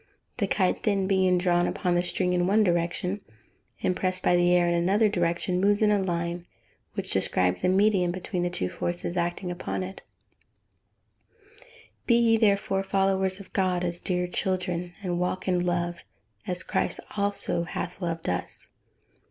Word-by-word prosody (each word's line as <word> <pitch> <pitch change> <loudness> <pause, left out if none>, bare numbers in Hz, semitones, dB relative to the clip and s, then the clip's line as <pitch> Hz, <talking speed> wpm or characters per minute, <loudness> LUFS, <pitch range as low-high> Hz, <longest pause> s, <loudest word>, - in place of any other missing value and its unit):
The 205 -5 0
kite 190 -2 +1
then 200 -2 +1
being 190 -1 +3
drawn 175 -1 +2
by 180 - -1
the 175 0 +3
string 180 0 -1
in 175 0 +1
one 210 +3 +4
direction, 175 +2 0 0.6
and 185 - +1
pressed 185 0 -1
by 175 - +4
the 175 0 +3
air 175 -1 +4
in 170 - +2
another 190 +6 +3
direction, 180 -1 0
moves 205 +2 +3
in 210 - +4
a 205 -1 +3
line 175 -1 -2 0.5
which - - -3
describes 90 0 +1
a - - +3
medium 190 -2 +3
between 180 0 -4
the 175 - 0
two 95 - -2
forces 175 - -3
acting 175 +1 -1
upon 175 +1 -3
it. 190 +1 -8 1.6
[Verse: - - -20 0.4
"Be 235 - +5
ye 230 -1 +4
therefore 200 -3 +2
followers 195 -1 +1
of 195 - -13
God, 185 -2 +1
as 175 -1 -1
dear 180 -1 -1
children; 180 -1 -2
and 175 -2 -1
walk 180 +1 -2
in 180 -1 +2
love, 175 -1 -1 0.5
as 180 -1 -2
Christ - - 0 0.2
also 200 -4 -1
hath 175 - -5
loved 165 -2 -3
us." 90 0 -4
180 Hz, 170 wpm, -27 LUFS, 175-195 Hz, 1.6 s, Be